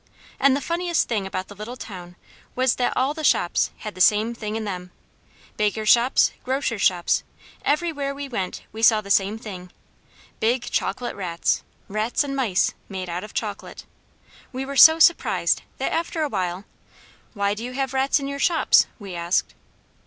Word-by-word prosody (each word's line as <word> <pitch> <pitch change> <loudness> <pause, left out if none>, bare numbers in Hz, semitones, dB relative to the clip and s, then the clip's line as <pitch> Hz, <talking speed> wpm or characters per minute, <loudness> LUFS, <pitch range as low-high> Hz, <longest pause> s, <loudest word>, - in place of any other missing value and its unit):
And 275 -1 +4
the 285 - -2
funniest 340 +2 0
thing 210 -5 -1
about 185 -1 -4
the - - -11
little 215 +5 -8
town 180 -6 -9 0.4
was 255 -1 +2
that 250 - 0
all 265 +3 +1
the 315 0 -7
shops 175 -10 +2
had 215 - -7
the 185 - -6
same 215 +4 +4
thing 215 -2 -5
in 225 - -3
them; 180 -3 -5 0.7
bakers' 210 +1 0
shops, 240 +2 +5
grocers' 260 -5 -1
shops, 175 -3 +2 0.4
everywhere 290 -3 -1
we 285 0 -6
went 195 -8 -4
we 220 - -7
saw 220 -1 +5
the 200 -1 -7
same 200 +2 +2
thing, 185 -5 -9 0.7
big 240 +2 +1
chocolate 240 +5 -2
rats, 175 -4 -1 0.3
rats 215 +7 0
and 275 -1 -4
mice, 230 -9 +1 0.2
made 185 -2 -5
out 175 +1 -4
of 210 - -11
chocolate. - - -5 0.7
We 265 +1 -4
were 280 +1 -6
so 320 +4 +9
surprised 330 +1 +3 0.2
that - - -2
after 330 -1 -1
a 300 - -1
while, 185 -3 -3 0.7
"Why 200 0 +1
do 215 +2 -7
you 250 +1 -5
have 270 0 -2
rats 270 +2 +2
in 275 - -4
your 280 0 -5
shops?" 335 +2 +4
we 200 -4 -9
asked. 170 +1 0
225 Hz, 175 wpm, -23 LUFS, 195-275 Hz, 0.7 s, so